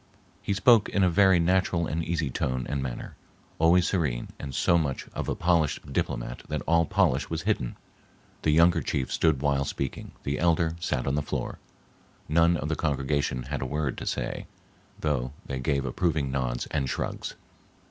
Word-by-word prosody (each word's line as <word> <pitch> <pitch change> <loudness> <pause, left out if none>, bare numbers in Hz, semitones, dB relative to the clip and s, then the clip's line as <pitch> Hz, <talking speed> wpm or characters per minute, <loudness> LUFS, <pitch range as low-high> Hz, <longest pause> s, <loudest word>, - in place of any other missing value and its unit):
He 100 - -1
spoke 110 +1 +5
in 100 - +1
a 90 - +4
very 95 -1 +5
natural 90 0 +2
and 80 +1 -2
easy 80 -5 -1
tone 65 0 -1
and 70 -2 -2
manner 65 -2 -5 0.5
always 85 +2 +5
serene 70 -11 -1
and 70 -3 -6
so 85 - +3
much 70 -5 -2
of - - -3
a - - 0
polished 85 -3 +1
diplomat - - -2
that 75 -3 -2
all 85 0 +3
polish - - +2
was - - -3
hidden. - - -1 0.7
The - - +1
younger 85 +3 +5
chief 65 -2 -2
stood 75 -4 +2
while 70 -1 +2
speaking, 70 0 -4
the 70 +1 -2
elder 85 -1 +2
sat 75 -7 -1
on 70 - 0
the 75 - +1
floor. - - -4 0.7
None 85 +2 +4
of 75 - -3
the 80 - 0
congregation 70 -4 -1
had 70 +3 -4
a - - -1
word 75 -1 -1
to - - -6
say, - - -3 0.5
though 65 -4 -1
they 65 -1 -4
gave 70 +1 0
approving 75 0 0
nods 65 -3 -1
and 70 -4 0
shrugs. - - -3
75 Hz, 180 wpm, -27 LUFS, 65-85 Hz, 0.7 s, spoke